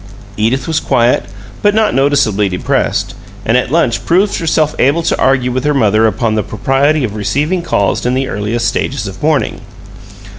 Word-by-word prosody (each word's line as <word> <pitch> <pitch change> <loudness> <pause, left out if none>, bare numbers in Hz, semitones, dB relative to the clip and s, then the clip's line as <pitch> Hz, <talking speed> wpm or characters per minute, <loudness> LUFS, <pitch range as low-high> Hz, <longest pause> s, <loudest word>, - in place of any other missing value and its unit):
Edith 115 +8 0
was 160 -1 0
quiet, 120 +1 +1 0.4
but 205 0 +2
not 220 -1 +2
noticeably 135 -8 +2
depressed, 90 - -1 0.3
and 115 - +2
at 125 0 +1
lunch 140 -6 +1
proved 195 +4 +1
herself 155 -2 +1
able 145 +6 +2
to - - 0
argue 130 -2 +2
with 130 +1 -2
her 150 0 +1
mother 110 -3 +3
upon 110 +1 -1
the 110 - +1
propriety 135 +8 0
of 110 -4 -2
receiving 145 - -1
calls 100 - 0
in 125 +1 0
the 135 0 -1
earliest 115 +2 -2
stages - - -2
of - - -8
"mourning." - - 0
130 Hz, 175 wpm, -14 LUFS, 110-150 Hz, 0.4 s, mother